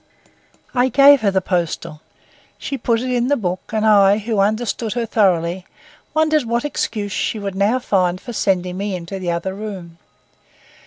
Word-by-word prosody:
I 250 0 +2
gave 280 +2 +6
her 210 - +2
the 190 -1 +1
postal. 170 -3 -3 0.6
She 280 - -5
put 230 -2 0
it 255 0 -3
in 245 -1 +1
the 285 +1 +2
book 185 -4 -2
and 215 0 0
I, 200 -2 +5
who 215 0 -2
understood 215 +2 0
her 240 -1 -2
thoroughly, 185 -5 +1 0.5
wondered 310 -3 +2
what 235 +3 -1
excuse 215 -7 -3
she 220 - -2
would 200 -2 -4
now 200 +6 +1
find 185 -7 0
for 240 - -8
sending 185 -4 0
me 200 0 -3
into 180 +2 -6
the 180 -2 -3
other 170 +3 -2
room. 190 -5 -8
205 Hz, 170 wpm, -19 LUFS, 185-235 Hz, 0.6 s, gave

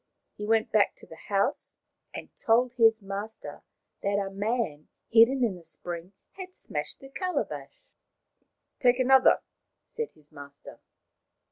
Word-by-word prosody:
He 210 - -6
went 225 0 +2
back 210 -1 +3
to - - -16
the 160 - -14
house 200 -1 0 0.3
and - - -9
told 240 +2 +2
his 225 -3 +4
master 200 +3 -6 0.4
that 200 0 0
a 195 -1 -2
man 200 -7 -2 0.2
hidden 235 +4 +6
in 225 -5 +2
the 175 - -13
spring 175 +2 -6 0.2
had 370 -1 -9
smashed - - -5
the 270 - -11
calabash. 365 +6 -4 0.5
" - - -49
Take 245 -1 +4
another," 260 0 +5 0.4
said 460 -2 -5
his 150 -1 -20
master. 140 0 -12
220 Hz, 140 wpm, -28 LUFS, 195-250 Hz, 0.5 s, hidden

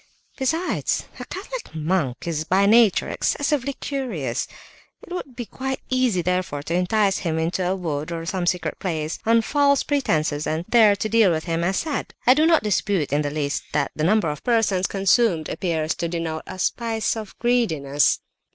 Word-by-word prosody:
"Besides, 320 +7 -1
a - - -6
Catholic - - -7
monk 155 -6 -1
is 155 -2 -1
by 190 +4 +2
nature 220 0 +5
excessively 285 -2 0
curious; 225 - -3 0.6
it - - -9
would 280 -8 -6
be 240 - -5
quite 265 +3 -4
easy 250 -9 +2
therefore 180 -5 -1
to 165 - -4
entice 195 +3 +2
him 165 -3 -2
into 165 +3 -1
a 180 +1 0
wood, 155 -4 -3
or 165 -1 -4
some 180 0 -2
secret 175 -4 -1
place, 160 -4 -3
on 230 0 +4
false 280 +1 +3
pretences, 155 - 0
and 160 +2 -2
there 220 -3 +5
to 210 - -2
deal 220 -2 +4
with 160 -2 0
him 165 0 -1
as 190 +2 +1
said. 305 -4 -3
But 250 - +7
I - - +9
do 305 +4 +3
not 330 -6 +4
dispute 195 -7 0
in 145 - +2
the 145 - -1
least 145 -1 -2
that 145 -2 0
the 155 - -2
number 190 -2 +3
of 150 - -8
persons 215 -6 +2
consumed 195 -4 +2
appears 160 -3 -1
to 170 - -1
denote 165 -2 -4
a - - -7
spice 225 +3 -1
of 215 -3 -8
greediness." 160 - +1
185 Hz, 185 wpm, -23 LUFS, 160-235 Hz, 0.6 s, I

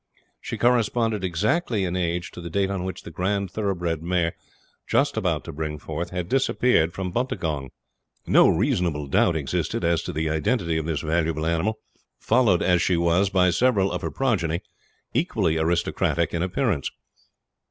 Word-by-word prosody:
She - - -5
corresponded 115 -3 +2
exactly 105 - 0
in 90 0 -2
age 85 -1 -2
to - - -9
the 85 - -6
date 95 +3 0
on 95 -2 -2
which 95 0 -5
the - - -9
grand 95 +3 -1
thoroughbred 90 -6 -2
mare, 85 -1 0 0.5
just 140 0 +2
about 90 -8 0
to 85 - -8
bring 75 0 -4
forth, 80 +3 -5
had 90 -1 -4
disappeared 125 -8 +2
from 90 0 -4
Buntagong. 85 - -2 0.6
No - - +6
reasonable 90 - +1
doubt 75 +4 +2
existed 70 -5 -2
as 85 -2 +2
to - - -5
the 80 +1 -2
identity 80 - 0
of 80 - -4
this 80 -2 -1
valuable 80 -1 0
animal, 85 +7 0 0.4
followed 110 -9 +3
as 90 -1 +3
she 90 - +2
was 85 +3 +2
by 90 -2 +3
several 105 -4 +2
of 90 - -3
her - - -2
progeny, 90 -11 0 0.5
equally 80 0 +1
aristocratic 85 0 0
in 85 - -1
appearance. 95 - 0
90 Hz, 165 wpm, -24 LUFS, 80-100 Hz, 0.6 s, No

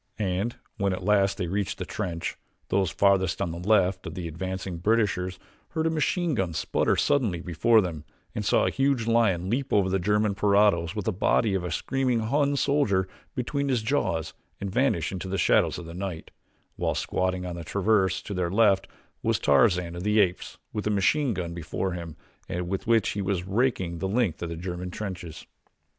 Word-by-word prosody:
And 100 +3 -1 0.2
when 100 -1 +1
at 90 - -5
last 100 -1 +3
they 90 - -1
reached 95 +3 -2
the - - -4
trench, 85 -2 -4 0.3
those 95 -2 +2
farthest 95 +1 +2
on 95 -4 -1
the 85 - -6
left 95 -1 +2
of - - -6
the 90 -3 -4
advancing 95 +2 -4
Britishers 95 -2 +1 0.4
heard 160 -1 0
a 165 - +2
machine 165 +2 0
gun 95 -8 -1
sputter - - +1
suddenly 115 -12 +1
before 90 +7 +3
them 85 -6 -4 0.3
and - - -3
saw - - +3
a - - +1
huge 135 -4 +1
lion 110 -7 +2
leap 130 +6 -1
over 100 -2 +3
the 95 - +2
German 105 +2 +2
parados 100 -5 +3
with 105 -3 -3
the 110 - 0
body 100 +2 +2
of 95 -2 0
a 90 - -3
screaming 130 0 0
Hun 140 +5 +1
soldier 140 -10 +2 0.3
between 140 +3 -1
his 125 -4 +1
jaws 95 - 0 0.3
and 100 -1 -4
vanish 95 - +1
into 95 -1 -5
the 95 +1 -2
shadows - - +3
of 90 - -7
the 85 - -8
night, 90 -2 -5 0.5
while - - 0
squatting 90 0 -1
upon 90 -1 -5
a - - -6
traverse 95 +1 +1
to 100 - -5
their 90 -2 -1
left 100 0 +3 0.3
was - - +1
Tarzan 85 +2 +3
of 85 - -5
the 105 +3 +2
Apes 90 -3 0 0.2
with 105 0 -2
a - - +2
machine 115 +5 +2
gun 85 -2 -4
before 85 +3 -3
him 85 -3 -6 0.3
with 90 +3 -3
which 115 -3 +3
he 100 - -2
was 95 -2 -1
raking 95 -5 0
the 95 - -1
length 105 -5 0
of 85 - -3
the 85 - -4
German 90 +1 -5
trenches. 90 -5 -6
95 Hz, 195 wpm, -26 LUFS, 90-110 Hz, 0.5 s, last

